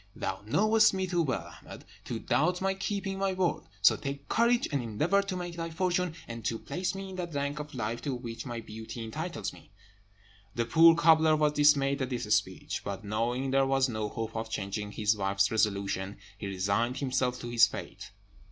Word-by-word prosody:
Thou - - -3
knowest 215 - +4
me 190 0 0
too 175 -2 0
well, 100 - -2
Ahmed, - - -11 0.2
to - - -3
doubt 180 +4 +1
my 195 0 +1
keeping 195 0 -3
my 195 -1 +1
word. 185 -2 0 0.2
So - - +7
take 140 0 -6
courage, 235 +1 +3
and 140 -2 0
endeavour 150 - +1
to 195 -1 -4
make 175 -1 -5
thy 165 0 -3
fortune, 180 0 0
and 115 -1 -7
to 115 - 0
place 180 +10 -3
me 195 0 -6
in 185 - -8
that 170 -4 -5
rank 140 +1 -2
of 150 -2 -7
life 120 0 -3
to 140 -1 -2
which 115 -2 -6
my 120 -2 -5
beauty 110 +1 -8
entitles 155 +10 -4
me." - - -16 0.9
The 120 - 0
poor 165 +6 +7
cobbler 160 -1 +5
was 150 -1 +2
dismayed 140 -2 +4
at 130 - -1
this 125 -2 -3
speech; - - -2
but 100 +1 -5
knowing 120 +5 -1
there 135 0 +3
was 135 0 +3
no 110 -2 -2
hope 115 +1 -5
of 110 0 -3
changing 105 0 -4
his 105 +1 +2
wife's 100 -1 +1
resolution, 100 -2 0 0.2
he 100 0 -6
resigned 100 +6 0
himself 130 -2 0
to 120 - -5
his 120 -1 +6
fate. - - -8
135 Hz, 200 wpm, -29 LUFS, 110-170 Hz, 0.9 s, So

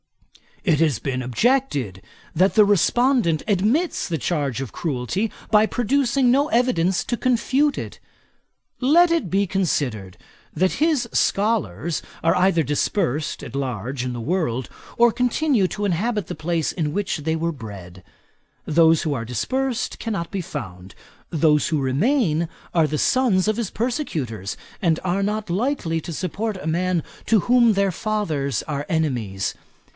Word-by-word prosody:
It 160 -7 +2
has 150 -8 +2
been 130 0 -3
objected, 130 - 0 0.3
that 185 +5 +3
the 215 -2 +6
respondent 205 - +2
admits 220 - +1
the 165 - -1
charge 145 -5 -1
of 135 - -5
cruelty, 165 - -2 0.2
by 215 0 +6
producing 250 +1 +1
no 280 +4 +3
evidence 190 -7 +2
to 240 - -2
confute 260 +4 +1
it. - - -7 0.8
Let 330 +7 +5
it 330 - 0
be 195 +2 +1
considered, 130 - -1 0.4
that 185 +1 +2
his 305 -6 +1
scholars 170 - 0 0.2
are 165 +1 +3
either 180 -2 +3
dispersed 150 +1 -1
at - - -8
large 130 -1 -3
in 125 -1 -3
the 120 - -5
world, 130 -3 -1 0.3
or 235 0 +5
continue 250 -2 +1
to 205 +5 -3
inhabit 205 +2 -1
the - - -5
place 160 0 -1
in 150 -4 -2
which 200 -2 -1
they 160 +2 -1
were 165 +1 -1
bred. 100 - -10 0.6
Those 160 0 +4
who 155 - -1
are 115 -2 -4
dispersed 245 - -2
cannot 200 -7 -3
be 195 - -3
found; 95 - -8 0.4
those 150 -2 +3
who 155 -3 0
remain 165 - +1 0.2
are 165 -3 +3
the 150 0 -2
sons 220 -8 +2
of 215 0 +1
his 230 -5 -2
persecutors, 155 - -3 0.2
and 165 -3 +2
are 185 +2 0
not 210 0 -2
likely 185 - -1
to 170 - -6
support 195 +5 -3
a 160 - -7
man 175 0 0 0.2
to 220 -4 +4
whom 240 0 +4
their 200 -1 +1
fathers 160 -10 -1
are 145 -1 -4
enemies. 120 - -1
175 Hz, 150 wpm, -22 LUFS, 145-225 Hz, 0.8 s, the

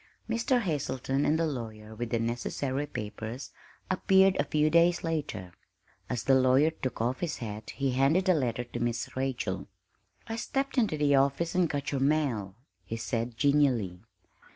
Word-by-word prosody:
Mr. 230 +3 +1
Hazelton 140 - -1
and 155 - +3
the 165 - +1
lawyer 110 -7 -5
with 120 +1 -4
the 115 - +1
necessary 130 +4 -2
papers 115 +1 -6 0.4
appeared 190 0 +4
a - - +4
few 150 +1 +2
days 170 +2 +4
later. 145 - -3 0.6
As 125 -3 -2
the 135 - +4
lawyer 130 +4 +5
took 130 -5 -5
off 120 +3 0
his 175 -3 -2
hat 110 -2 -6
he 140 -1 -1
handed 140 +9 +3
a 185 - +6
letter 125 -6 0
to 120 - -7
Miss 120 -1 -2
Rachel. 130 -1 -2 0.6
"I 225 - -4
stepped 270 +2 -1
into 210 -10 +1
the 145 -1 +3
office 140 +5 +2
and 180 -3 +2
got 140 -1 -2
your 135 -2 -1
mail," 135 -10 +1 0.3
he 115 - -5
said 115 +1 -3
genially. 130 -11 +2
135 Hz, 165 wpm, -29 LUFS, 120-160 Hz, 0.6 s, a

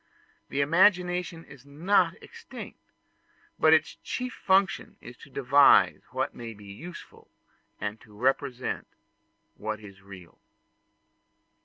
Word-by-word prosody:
The 140 - 0
imagination 180 +1 +2
is 140 -2 -15
not 160 +8 +1
extinct; - - -11 0.8
but 155 - +5
its 160 0 +3
chief 250 0 -4
function 190 0 +1
is - - -11
to - - -15
devise - - +5
what - - -2
may 115 -2 -8
be 105 0 -14
useful, 160 - -11 0.5
and 105 +1 -4
to 105 -3 -17
represent 130 +1 -1 0.7
what 110 0 -4
is 100 -2 -13
real. 95 -3 -14
140 Hz, 115 wpm, -27 LUFS, 105-175 Hz, 0.8 s, but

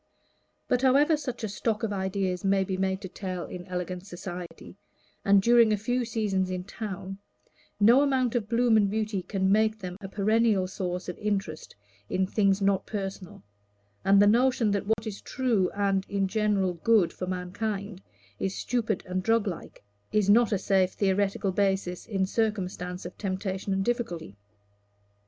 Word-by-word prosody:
But 250 - +1
however 280 +4 +4
such 270 -6 -5
a - - 0
stock 215 +3 -2
of 210 -2 -1
ideas 190 -2 -2
may 195 0 +3
be 190 0 -3
made 190 +1 -1
to 190 - -5
tell 185 -1 -5
in 180 0 -8
elegant 180 +1 -4
society, 175 -1 -8 0.5
and 200 -1 +5
during 235 -1 +5
a 210 - +2
few 245 +4 -1
seasons 205 -5 -1
in 185 -1 -3
town, 195 -1 -6 0.6
no 235 +6 +6
amount 260 -4 +1
of 225 -4 -1
bloom 235 -1 +4
and 205 -2 +3
beauty 215 -2 -1
can 190 0 0
make 215 +1 +3
them 180 -3 -7
a 195 - -6
perennial 215 -1 +2
source 180 -1 -4
of 180 - -6
interest 195 -7 -3 0.3
in 190 0 +1
things 195 0 +1
not 195 -1 +1
personal; 195 - -6 0.6
and 195 0 +5
the 205 - +7
notion 235 0 +3
that 200 0 -1
what 220 +1 0
is 210 -2 -6
true 235 -8 0
and, 195 -1 0
in 195 -1 0
general, 205 -3 +1
good 190 +1 +2
for 185 - -5
mankind, 195 +2 -4 0.4
is 195 0 -2
stupid 225 -5 -1
and 185 0 -2
drug 225 +2 +2
like, 175 - -7 0.3
is 205 -1 +3
not 230 +1 +5
a 205 - +2
safe 190 -1 +2
theoretic 195 0 0
basis 190 -2 0
in 195 -3 0
circumstances 185 -4 -2
of 175 - -7
temptation 190 0 -3
and 195 0 0
difficulty. 200 - -3
200 Hz, 165 wpm, -27 LUFS, 185-220 Hz, 0.6 s, the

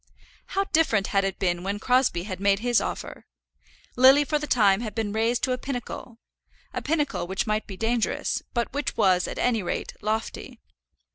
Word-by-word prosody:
How 390 - +4
different 310 - +2
had 195 0 +3
it 195 -1 -2
been 175 -2 0
when 200 +2 -2
Crosbie 250 -6 +2
had 185 -2 -6
made 200 0 +3
his 240 +2 +2
offer! - - -6 0.7
Lily 265 +3 +7
for 300 +1 0
the 300 - -5
time 205 -5 +4
had 220 -3 -5
been 220 -3 -2
raised 230 +2 0
to 260 - +1
a 250 - -1
pinnacle, 245 -3 -6 0.6
a - - -3
pinnacle 295 - -1
which 190 +1 -1
might 215 0 -1
be 195 - -8
dangerous, 225 +1 0
but 235 -1 -1
which 290 0 -3
was, 185 -4 +3
at - - -6
any 235 -3 +1
rate, 175 - -4
lofty. 220 +1 -3
225 Hz, 185 wpm, -25 LUFS, 195-250 Hz, 0.7 s, Lily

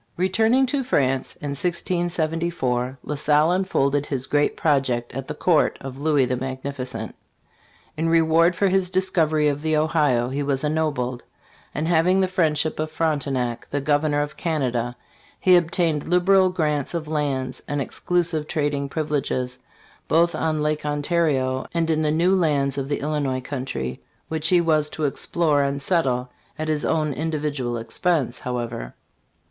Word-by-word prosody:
Returning 220 +8 +3
to 275 +1 -1
France 135 - 0
in 145 - -6
1674, 165 -5 -1
La - - -4
Salle 150 +2 +3
unfolded 145 -7 +1
his 130 -2 -2
great 145 +1 +1
project 130 -6 0
at 135 +1 -5
the 150 - -5
court 165 0 +2
of 135 0 -8
Louis 145 -3 +3
the 125 +1 -1
Magnificent. 130 -3 -4 0.8
In 165 +1 0
reward 165 +1 +4
for 200 +3 +2
his 190 -1 +1
discovery 165 -5 +1
of 145 0 -1
the 155 0 +1
Ohio 150 -6 +2
he 140 +2 -2
was 140 -1 -1
ennobled; 150 -5 -1 0.5
and 155 +2 -1
having 175 +3 +3
the 190 - +3
friendship 160 -5 0
of 155 0 -1
Frontenac, 140 -7 -1
the 145 - -1
governor 145 +1 +1
of 145 - -7
Canada, 125 -7 -1 0.4
he 185 -1 +5
obtained 165 -3 +1
liberal 185 +2 +4
grants 155 -4 -1
of 160 -2 -3
lands 140 -4 -2
and 145 0 -2
exclusive 165 +2 -1
trading 145 -3 -1
privileges 140 -5 -2 0.5
both 170 +1 +3
on 155 -1 -1
Lake 150 0 -1
Ontario 145 -3 0
and 165 -1 +1
in 155 0 +1
the 155 - +1
new 170 +5 +3
lands 145 -7 +1
of 135 0 -4
the 145 - -1
Illinois 140 -3 -1
country, 125 - -4 0.3
which 160 0 -1
he 180 0 +5
was 155 -3 +2
to 155 - -5
explore 150 +1 +1
and 140 0 -1
settle 130 -7 0 0.3
at 155 0 -3
his 150 -2 0
own 155 -2 0
individual 145 -5 -2
expense, 120 +2 -1
however. 120 -2 -4
150 Hz, 155 wpm, -23 LUFS, 135-165 Hz, 0.8 s, he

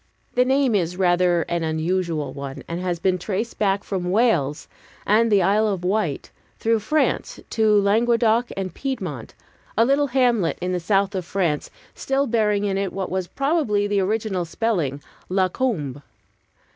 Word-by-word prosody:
The 250 0 +3
name 265 -1 +2
is 180 -3 0
rather 175 -2 +3
an 170 -1 -2
unusual 160 -2 -1
one, 140 -1 -7
and 170 +1 -4
has 180 -2 -1
been 185 +2 0
traced 210 +5 -3
back 200 -1 +1
from 180 -3 -3
Wales 180 - +1 0.4
and 225 +2 +3
the 200 -3 +4
Isle 210 +4 +3
of 195 -4 -2
Wight 185 -5 -1 0.3
through 225 0 +1
France 305 +8 0
to 215 -2 +4
Languedoc 230 +3 +2
and 190 -2 -3
Piedmont; 270 -1 -5 0.4
a 230 - +5
little 280 +3 +2
hamlet 240 -8 +2
in 180 +1 -2
the 180 - 0
south 195 +3 +1
of 185 -2 -2
France 170 -4 -1 0.2
still 270 +1 0
bearing 215 -4 +1
it 195 -1 0
in 195 -1 -1
what 190 -1 -4
was 185 -1 -2
probably 275 - 0
the 205 -1 +1
original 200 -1 -1
spelling 165 - -2 0.3
La 185 0 +2
Combe. 155 - -2
195 Hz, 160 wpm, -23 LUFS, 175-225 Hz, 0.4 s, a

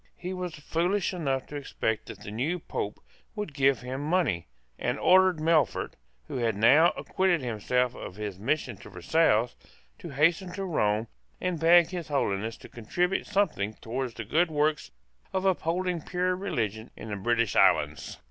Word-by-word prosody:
He 180 +1 -5
was 180 -2 -4
foolish 175 +6 -1
enough 135 -7 -1
to 150 - -10
expect 110 -6 -2
that - - -9
the 105 - -8
new 135 +11 -1
Pope 105 -10 -5 0.4
would 210 -8 -4
give 135 -2 +2
him 130 +2 -5
money, 150 - 0 0.3
and - - -1
ordered 185 -1 +5
Melfort, 155 -1 +1 0.3
who - - -4
had 115 -3 0
now 140 +11 +6
acquitted 185 -4 +1
himself 125 +1 0
of 90 - -8
his 105 -3 -5
mission 125 -1 -1
at - - -14
Versailles, 115 - +2 0.5
to - - -8
hasten 165 +6 +2
to 195 +1 -4
Rome, 110 - +1 0.3
and 180 -3 -2
beg 170 +1 +6
His 175 -3 -5
Holiness 110 -6 -1
to - - -10
contribute 175 - -1
something 150 - 0
towards 125 +1 -4
the 110 - -6
good 165 - +2
work 150 0 +1 0.5
of 190 0 -1
upholding 180 -1 0
pure 180 +3 -1
religion 115 - -3
in 110 - -8
the 105 - -3
British 115 +2 0
islands. - - +2
150 Hz, 165 wpm, -28 LUFS, 115-180 Hz, 0.5 s, now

